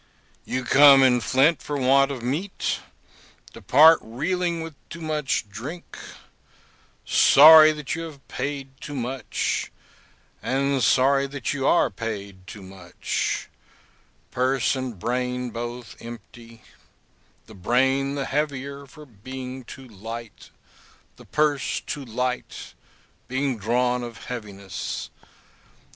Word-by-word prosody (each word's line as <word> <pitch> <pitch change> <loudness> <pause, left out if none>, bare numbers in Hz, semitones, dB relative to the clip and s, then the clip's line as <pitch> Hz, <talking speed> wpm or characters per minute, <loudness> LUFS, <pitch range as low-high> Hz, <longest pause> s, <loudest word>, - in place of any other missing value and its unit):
You 130 - -3
come 140 +1 +7
in 125 -2 +4
faint 135 +9 +2
for 145 - -4
want 135 +1 +3
of 130 -4 -6
meat, 155 +11 -2 0.7
depart 160 +2 +6
reeling 170 +8 -2
with 165 -1 -8 0.2
too 170 - -8
much 150 -8 -2
drink; 125 - -9 1.1
sorry 155 +2 +8
that 150 -2 -5
you 165 - -4
have 145 -4 -12
paid 135 +1 -4
too 145 - -7
much, 125 -1 -3 0.7
and 135 0 0
sorry 135 +3 +3
that 135 -2 -4
you 140 -1 -1
are 170 - +3
paid 100 -3 -7
too 100 0 -10
much; 95 -2 -4 0.8
purse 130 +1 +1
and 130 -5 -5
brain 125 +3 -2
both 120 -5 -7
empty; 115 -1 -12 0.8
the 110 - -14
brain 135 +7 +1
the 140 -1 -2
heavier 140 -1 -3
for 150 +3 -14
being 130 +2 -8
too 130 +2 -12
light, 115 +1 -9 0.7
the - - -15
purse 150 -3 0
too 145 - -6
light, 125 +1 -4 0.5
being 135 +1 -1
drawn 125 +4 0
of 120 -1 -8
heaviness. 100 -5 -6
130 Hz, 115 wpm, -24 LUFS, 115-140 Hz, 1.1 s, sorry